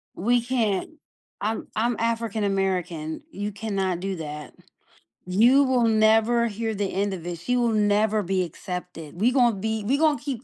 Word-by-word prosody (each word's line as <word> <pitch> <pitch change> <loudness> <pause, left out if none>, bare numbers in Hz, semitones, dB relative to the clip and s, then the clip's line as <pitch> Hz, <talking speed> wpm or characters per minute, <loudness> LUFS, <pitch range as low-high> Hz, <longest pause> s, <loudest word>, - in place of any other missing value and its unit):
We 240 +5 +2
can't. 230 -3 -1 0.5
I'm 220 +2 -2
I'm 230 +1 0
African 230 -2 -1
American, 180 - -2
you 205 -2 -4
cannot 195 -4 -2
do 190 0 -3
that. 150 -1 -7 0.7
You 240 +9 +5
will 255 -3 +2
never 225 +2 +3
hear 220 +1 -3
the 200 -1 -2
end 200 +1 -1
of 175 -2 -7
it; 175 -1 -4
she 245 +8 -1
will 240 -1 +2
never 210 0 +2
be 185 +1 0
accepted. 180 -1 -7
We 245 +3 +4
gonna 240 -4 +3
be 220 +2 -2
we 270 +5 +2
gonna 305 -2 +3
keep 265 -4 -5
215 Hz, 165 wpm, -25 LUFS, 190-235 Hz, 0.7 s, You